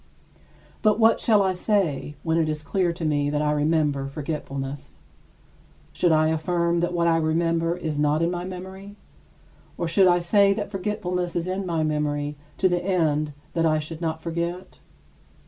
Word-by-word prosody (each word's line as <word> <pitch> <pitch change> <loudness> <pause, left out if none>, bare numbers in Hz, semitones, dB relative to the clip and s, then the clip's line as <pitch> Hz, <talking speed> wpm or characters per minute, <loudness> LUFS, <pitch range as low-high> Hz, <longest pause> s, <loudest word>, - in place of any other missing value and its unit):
But 215 -1 +3
what 225 0 +5
shall 210 -3 +4
I 190 -1 +1
say, 180 -7 0
when 165 0 +1
it 160 -1 +1
is 155 0 -3
clear 185 0 0
to 170 -1 -5
me 145 -2 +1
that 150 0 0
I 150 - +1
remember 150 -2 +1
forgetfulness? 140 -2 -5 1.0
Should 175 - +2
I 155 0 +4
affirm 170 +2 0
that 175 +1 0
what 170 -1 +1
I 165 -1 +4
remember 165 +1 +1
is 155 -4 -3
not 150 +2 +2
in 170 - +1
my 175 0 -3
memory? 190 +2 -8 0.8
Or 170 - -2
should 185 +3 +4
I 175 0 +5
say 200 +3 +4
that 205 -1 -4
forgetfulness 180 -3 -2
is 170 +1 -1
in 190 +1 -2
my 165 -2 0
memory 150 -1 -1 0.2
to 190 - +3
the 175 -1 0
end 155 -5 +1 0.2
that 165 -1 +2
I 155 -1 +2
should 155 +2 -6
not 160 -1 -3
forget? 170 +2 -4
165 Hz, 175 wpm, -24 LUFS, 155-180 Hz, 1.0 s, what